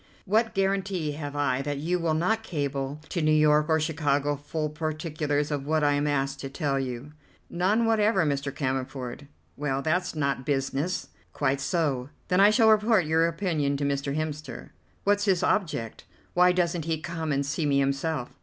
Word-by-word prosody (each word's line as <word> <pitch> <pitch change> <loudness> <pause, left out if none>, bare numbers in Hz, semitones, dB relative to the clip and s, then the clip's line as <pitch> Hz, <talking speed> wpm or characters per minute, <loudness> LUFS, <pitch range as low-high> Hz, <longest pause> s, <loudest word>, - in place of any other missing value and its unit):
What 220 +3 +1
guarantee 195 -4 0
have 145 -1 -6
I 135 -2 +1
that 145 0 -3
you 170 +5 -1
will 165 -2 0
not 215 +8 +1
cable 145 -6 -3
to 170 - -1
New 155 0 +3
York 150 0 +4
or 160 0 +3
Chicago 145 -2 0
full 150 +2 -4
particulars 150 -1 -2
of 140 -1 -3
what 155 0 +1
I 145 - +4
am 145 +1 0
asked 135 -1 -1
to 135 - -5
tell 140 -1 -1
you." 130 +2 -5 0.4
"None 200 +7 +2
whatever, 215 -5 +3
Mr. 140 -1 -1
Cammerford." 130 0 -4 0.3
"Well, 135 -1 -2
that's 175 +2 0
not 140 -3 -1
business." 140 +5 -1 0.2
"Quite 140 -1 0
so. 140 -4 0 0.2
Then 180 0 +3
I 200 +1 +8
shall 220 0 +5
report 215 -3 +4
your 160 +2 +3
opinion 165 -5 -1
to 145 - -3
Mr. 140 0 -1
Hemster." 155 -1 -5 0.3
"What's 205 0 +2
his 190 -4 +2
object? 150 - -1 0.3
Why 180 0 +5
doesn't 175 -2 0
he 165 -1 -1
come 160 -1 -4
and 140 0 0
see 150 +2 -1
me 140 -1 +2
himself?" 140 0 -1
150 Hz, 175 wpm, -27 LUFS, 140-175 Hz, 0.4 s, I